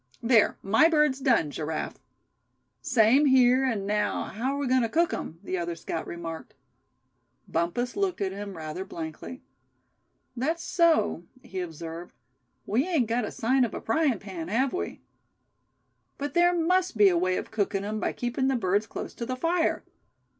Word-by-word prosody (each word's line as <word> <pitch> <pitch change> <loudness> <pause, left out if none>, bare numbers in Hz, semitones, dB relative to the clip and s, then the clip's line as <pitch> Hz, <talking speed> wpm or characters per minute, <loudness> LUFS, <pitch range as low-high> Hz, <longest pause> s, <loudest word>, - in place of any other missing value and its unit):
There, 230 -2 +4
my 225 +12 +5
bird's 300 -4 +2
done, 240 - +2
Giraffe." 155 +1 -4 0.8
"Same 260 +2 +4
here; 260 0 +5
and 225 -7 -1
now 210 0 0
how 250 +6 -3
are - - -3
we 285 - -1
agoin' 255 0 +3
to 230 - 0
cook 335 +7 +2
'em?" 165 - -5
the 185 -2 -2
other 170 0 -3
scout 165 0 -5
remarked. 165 -1 -7 0.9
Bumpus 175 +10 -1
looked 395 -3 -1
at 195 -2 -1
him 200 -1 -7
rather 160 +3 -5
blankly. 165 +7 -8 0.9
"That's 315 +7 -1
so," 335 - +2 0.2
he 190 - -6
observed, 165 0 -7 0.5
"we 245 - +1
ain't 320 -9 +2
got 230 0 0
a - - -5
sign 255 +3 +2
of 235 - -2
a - - -3
frying 280 -1 +1
pan, 185 -5 -7
have 250 +7 +1
we?" 365 - -4 1.2
"But 285 0 -4
there 350 +1 +4
must 360 -2 +1
be 205 -1 +7
a 180 - +1
way 185 +2 +1
of - - -5
cooking 200 -2 -1
'em 215 +1 -3
by - - -1
keeping 245 +2 -2
the 270 - +2
birds 205 -1 +1
close - - -6
to 235 - -5
the 255 - -2
fire. 330 +5 0
230 Hz, 170 wpm, -27 LUFS, 185-275 Hz, 1.2 s, be